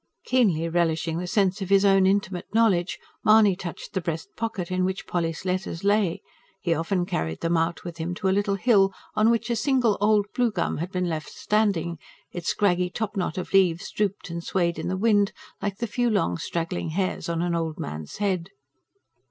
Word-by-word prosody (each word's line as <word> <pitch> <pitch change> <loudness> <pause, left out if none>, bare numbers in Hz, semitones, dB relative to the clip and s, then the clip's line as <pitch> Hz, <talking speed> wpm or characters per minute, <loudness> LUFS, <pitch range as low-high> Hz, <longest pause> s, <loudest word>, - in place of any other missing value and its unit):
Keenly 195 -11 +2
relishing 165 -1 0
the 180 - -4
sense 195 +1 +1
of 190 - -4
his 195 0 +5
own 195 -1 +5
intimate 190 -2 -1
knowledge, 195 -6 +3 0.3
Mahony 215 -3 +6
touched 175 -2 -7
the 190 - -1
breast 165 -1 -4
pocket 220 -6 -3
in 185 0 +1
which 190 +1 -2
Polly's 165 0 -2
letters 180 -2 -2
lay 200 -4 +2 0.4
he 170 -3 +1
often 170 +3 0
carried 80 - -3
them 165 +1 +1
out 165 +1 0
with 175 -2 -7
him 170 +2 -3
to 190 - -2
a - - +3
little 200 0 +1
hill, 195 -2 +4 0.2
on 215 +1 +3
which 235 +1 +1
a - - +2
single 245 -5 +2
old 210 -1 +4
blue 245 -1 +2
gum - - -1
had 175 +4 -4
been 180 -1 -1
left 160 -2 -3
standing; 190 -6 0 0.3
its 175 -2 -6
scraggy 180 -3 +2
top 215 +2 -4
knot 185 -4 -2
of 185 - -5
leaves 180 -3 +3
drooped 200 -3 -2
and 170 0 -4
swayed 170 -3 0
in 160 - -3
the 185 +1 -1
wind, 205 -1 +3 0.3
like 200 -1 -2
the 235 - -2
few 240 +2 0
long 200 - +1
straggling 165 - -3
hairs 185 +1 -2
on 170 0 0
an 175 -1 0
old 165 -2 -2
man's 75 +1 -6
head. 190 -4 -1
185 Hz, 200 wpm, -25 LUFS, 170-205 Hz, 0.4 s, Mahony